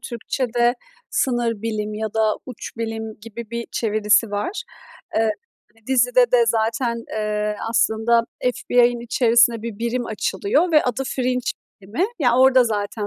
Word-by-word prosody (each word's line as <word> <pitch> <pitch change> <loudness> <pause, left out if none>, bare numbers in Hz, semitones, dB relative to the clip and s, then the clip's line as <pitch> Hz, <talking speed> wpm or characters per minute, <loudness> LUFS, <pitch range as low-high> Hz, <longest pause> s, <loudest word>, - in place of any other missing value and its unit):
Türkçede 240 0 -1 0.4
"sınır 235 -4 0
bilim" 215 -2 -3
ya 215 0 -4
da 220 -1 +2
"uç 250 -3 -7
bilim" 225 -1 -5
gibi 230 +1 -9
bir 235 0 -3
çevirisi 215 0 +2
var. 205 - -3 0.5
Eee, 220 -1 +3 0.6
dizide 245 -1 +3
de 240 -2 +5
zaten, 230 +1 0
eee, 210 -1 -2
aslında 230 +1 +2 0.2
FBI'ın 245 -1 +2
içerisinde 235 -1 +3
bir 225 -2 -6
birim 235 +1 -2
açılıyor 220 - 0
ve 305 - +6
adı 250 +1 -1
Fringe 250 -1 -1 0.3
bilimi, 205 - -2
yani, 245 -6 +3
orda 260 -1 +6
zaten 210 -1 -2
230 Hz, 135 wpm, -21 LUFS, 220-245 Hz, 0.6 s, ve